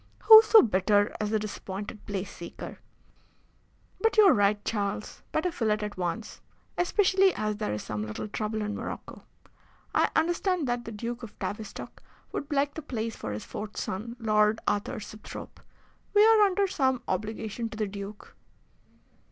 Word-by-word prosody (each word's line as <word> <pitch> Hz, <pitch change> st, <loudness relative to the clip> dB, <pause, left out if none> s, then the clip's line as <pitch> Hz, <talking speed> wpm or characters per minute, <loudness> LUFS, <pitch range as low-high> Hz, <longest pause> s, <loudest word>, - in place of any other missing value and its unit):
Who 440 Hz, -1 st, +11 dB
so 440 Hz, 0 st, +7 dB
bitter 205 Hz, -1 st, +2 dB
as 210 Hz, -, -1 dB
the 220 Hz, -, +2 dB
disappointed 205 Hz, 0 st, -6 dB
place 195 Hz, -2 st, -4 dB
seeker? 170 Hz, -, -8 dB, 1.2 s
But 450 Hz, -1 st, +1 dB
you 430 Hz, -, +9 dB
are 390 Hz, -, +7 dB
right, 205 Hz, 0 st, +2 dB
Charles. 205 Hz, -1 st, -3 dB
Better 350 Hz, +3 st, 0 dB
fill 230 Hz, -10 st, -1 dB
it 210 Hz, 0 st, +1 dB
at 210 Hz, -1 st, -4 dB
once, 185 Hz, +4 st, -4 dB, 0.3 s
especially 380 Hz, +1 st, +3 dB
as 215 Hz, -1 st, -2 dB
there 215 Hz, -, -2 dB
is 105 Hz, -, -3 dB
some 105 Hz, 0 st, -4 dB
little 105 Hz, -, -5 dB
trouble 215 Hz, +1 st, -3 dB
in 210 Hz, 0 st, -3 dB
Morocco. -, -, -7 dB, 0.7 s
I -, -, +3 dB
understand 345 Hz, -1 st, +1 dB
that 240 Hz, 0 st, -2 dB
the 230 Hz, -, -6 dB
Duke 235 Hz, +3 st, -5 dB
of 225 Hz, -3 st, -10 dB
Tavistock 215 Hz, 0 st, -6 dB, 0.3 s
would 285 Hz, -, -5 dB
like 285 Hz, 0 st, +1 dB
the 320 Hz, -, -6 dB
place 230 Hz, -6 st, -4 dB
for 110 Hz, -, -5 dB
his 105 Hz, +1 st, -5 dB
fourth 210 Hz, 0 st, -7 dB
son, 225 Hz, +5 st, -4 dB
Lord 215 Hz, -1 st, +2 dB
Arthur 205 Hz, +1 st, -1 dB
Sibthorpe. 215 Hz, +1 st, -9 dB, 0.6 s
We 415 Hz, +1 st, +7 dB
are 445 Hz, -1 st, +6 dB
under 395 Hz, +1 st, +1 dB
some 260 Hz, -9 st, 0 dB
obligation 220 Hz, +1 st, -3 dB
to 220 Hz, -, -9 dB
the 215 Hz, -, 0 dB
Duke." 200 Hz, +1 st, -8 dB
215 Hz, 165 wpm, -28 LUFS, 205-285 Hz, 1.2 s, Who